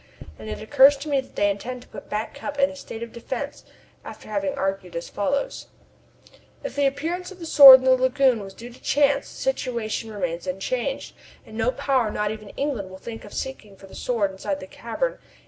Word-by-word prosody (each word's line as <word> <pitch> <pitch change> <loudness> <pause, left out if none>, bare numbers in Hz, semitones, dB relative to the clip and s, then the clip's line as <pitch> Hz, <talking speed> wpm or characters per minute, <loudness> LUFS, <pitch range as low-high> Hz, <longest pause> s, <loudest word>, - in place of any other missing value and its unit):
And 110 - -8
it - - -5
occurs 275 +4 +6
to 290 +2 -7
me 280 -2 +2
that - - -19
they 205 0 +3
intend 245 +5 -6
to - - -21
put - - -11
Back 210 +1 -3
Cup 285 0 -6
in 280 0 +3
a - - -10
state 235 -4 -7
of 235 - -9
defence 260 +4 -5 0.4
after - - -10
having 200 -2 -1
argued 195 -2 -3
as 170 - -5
follows: 275 +8 -2 1.0
"If - - -5
the 285 -1 +3
appearance 335 +7 -3
of 380 - -11
the 340 - -8
Sword 275 -4 +11
in - - -5
the 260 - +5
lagoon 255 -2 +3
was 195 -1 -9
due 240 +2 -10
to - - -17
chance 285 -1 +2
the - - -13
situation 235 - -2
remains 175 -4 -3
unchanged, 245 +9 -3 0.3
and 220 - -12
no 225 +2 +1
power, 255 -3 +1
not 210 0 -1
even 215 -1 -8
England, 265 -9 -2
will 190 - -10
think 225 +3 -8
of - - -12
seeking 215 -7 -6
for 195 - -15
the 190 - -15
Sword 215 -6 -1
inside 190 0 -4
the - - -8
cavern. 235 - -3
240 Hz, 215 wpm, -24 LUFS, 205-275 Hz, 1.0 s, Sword